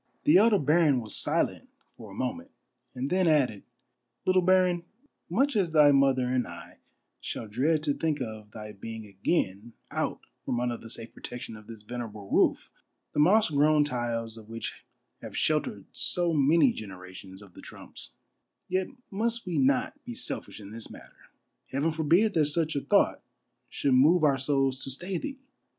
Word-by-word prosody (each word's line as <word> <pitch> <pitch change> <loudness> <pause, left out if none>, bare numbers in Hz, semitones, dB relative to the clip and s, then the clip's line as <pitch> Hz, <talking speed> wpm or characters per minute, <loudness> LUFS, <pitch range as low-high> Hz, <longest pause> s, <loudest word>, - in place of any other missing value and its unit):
The 155 - +6
elder 215 +1 +5
baron 150 -3 +3
was 110 -3 -5
silent - - 0 0.3
for 110 -3 -11
a 100 - -11
moment, 255 - -3 0.5
and 130 +4 -3
then 185 -1 +3
added: 135 -10 +2 0.3
" 120 -1 -52
Little 185 0 +4
baron, 180 -1 +3 0.5
much 265 +9 +1
as 190 -5 +2
thy 150 -2 +6
mother 135 -2 +3
and 125 -1 0
I - - -11 0.4
shall 110 - -5
dread 145 +9 +1
to 145 -2 +1
think 155 0 -1
of 110 -4 -6
thy 105 0 -8
being 110 +2 -8
again 100 - -2 0.2
out - - -2 0.2
from 120 - -1
under 120 -1 -1
the 115 - -12
safe 115 0 -8
protection 125 -2 -8
of 105 0 -13
this 115 -2 -11
venerable 110 -3 -7
roof, - - +2 0.4
the - - -1
moss 195 +5 +5
grown 150 +1 +4
tiles 120 -4 -3
of 110 -1 -13
which 115 0 -5 0.5
have - - -7
sheltered 140 -10 0
so 170 +7 -1
many 160 - +4
generations 95 - -10
of 95 -3 -17
the - - -12
Trumps, - - -10 0.5
yet 185 +1 0 0.2
must 230 +3 -1
we 180 -2 -1
not 270 +2 +1
be 245 -2 -7
selfish 250 - -4
in 100 -1 -10
this 115 0 -6
matter. - - -15 0.4
Heaven 145 +5 0
forbid 165 +7 +3
that 160 -4 +3
such 160 +1 0
a 140 - 0
thought - - +2 0.5
should 140 - 0
move 155 +7 +5
our 140 -3 +4
souls 135 -1 0
to - - -5
stay 175 +7 -2
thee 275 -2 -5
140 Hz, 170 wpm, -28 LUFS, 115-175 Hz, 0.5 s, The